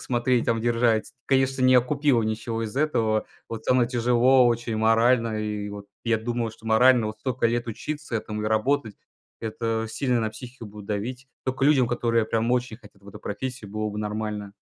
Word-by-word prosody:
смотреть, 120 0 0
там 115 - +2
держать, 115 -1 +1
конечно, 135 -1 +2
не 130 0 +5
окупила 130 0 +3
ничего 110 +1 -2
из 110 - -6
этого. 115 -8 +1 0.2
Вот 115 -1 -6
там 125 -1 +4
и - - +2
тяжело 125 +1 +4
очень 120 -1 0
морально, 115 0 +3
и 105 -1 -3
вот 100 0 -8 0.2
я 115 -1 +2
думал, 115 +1 -2
что 110 +1 -15
морально 115 0 +5
вот 110 0 -8
столько 130 -1 0
лет 120 +1 -1
учиться 145 +3 -5
этому 105 -1 -4
и - - -1
работать 110 +1 +1 0.5
это 115 0 -2
сильно 125 +2 0
на 110 -1 -1
психику 120 +2 -10
будет 105 -1 -11
давить. 125 +6 -4 0.2
Тока 130 +1 -1
людям, 135 -5 +4
которые 115 -1 +1
прям 115 +1 0
очень 125 -3 -1
хотят 105 -4 -18
в 100 - -14
эту - - -10
профессию, 115 -1 -5
было 110 0 -2
бы 105 - -6
нормально. 105 -1 -4
115 Hz, 190 wpm, -25 LUFS, 110-125 Hz, 0.5 s, не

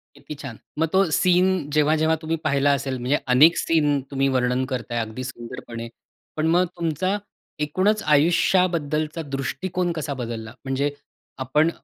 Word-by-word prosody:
किती 150 - -9
छान. 140 -6 -8 0.2
मग 165 - +2
तो 190 - +5
सीन 180 -2 +2
जेव्हा-जेव्हा 155 +2 +3
तुम्ही 165 +1 -2
पाहिला 140 0 +2
असेल 135 -2 -3
म्हणजे 125 +4 +1 0.2
अनेक 160 +6 +6
सीन 150 -3 +2
तुम्ही 135 0 +1
वर्णन 125 0 +1
करताय 120 -2 -3
अगदी 115 +3 -4
सुंदरपणे, 120 -1 -7 0.5
पण 155 +1 0
मग 175 +2 +4
तुमचा 170 +4 0 0.5
एकूणच 190 +8 +1
आयुष्याबद्दलचा 160 0 +2
दृष्टिकोन 175 +6 -2
कसा 145 -2 -3
बदलला? 115 -3 -6
म्हणजे 135 +2 0 0.5
आपण 150 +5 +2
150 Hz, 135 wpm, -23 LUFS, 130-165 Hz, 0.5 s, अनेक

